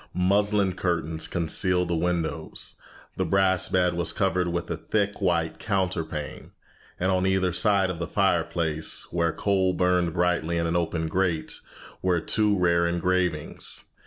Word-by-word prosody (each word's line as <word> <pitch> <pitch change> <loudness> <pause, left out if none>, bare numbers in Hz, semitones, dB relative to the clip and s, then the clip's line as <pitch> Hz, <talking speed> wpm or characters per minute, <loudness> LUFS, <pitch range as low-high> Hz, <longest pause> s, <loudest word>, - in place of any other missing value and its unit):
Muslin 100 +1 +2
curtains 80 -3 -1
concealed 90 +2 +1
the 85 - -1
windows, 85 -2 -2 0.4
the 95 - +1
brass 95 +1 +2
bed 90 -1 +2
was 85 -1 +1
covered 95 -3 0
with 85 0 -2
a - - 0
thick 100 +6 -2
white 85 -4 0
counterpane, 90 -7 -3 0.5
and 95 +1 +1
on 95 0 +1
either 95 -2 +1
side 95 0 +2
of 85 - -7
the 85 - -3
fireplace, 85 -4 0
where 85 -1 +1
coal 95 -1 +1
burned 90 -1 +1
brightly 85 -1 0
in 85 - 0
an 85 +1 -1
open 85 -1 -1
grate, 85 -2 -1 0.4
were 90 -2 +2
two 105 +4 +1
rare 85 -1 +2
engravings. 85 -2 -1
90 Hz, 145 wpm, -26 LUFS, 85-95 Hz, 0.5 s, Muslin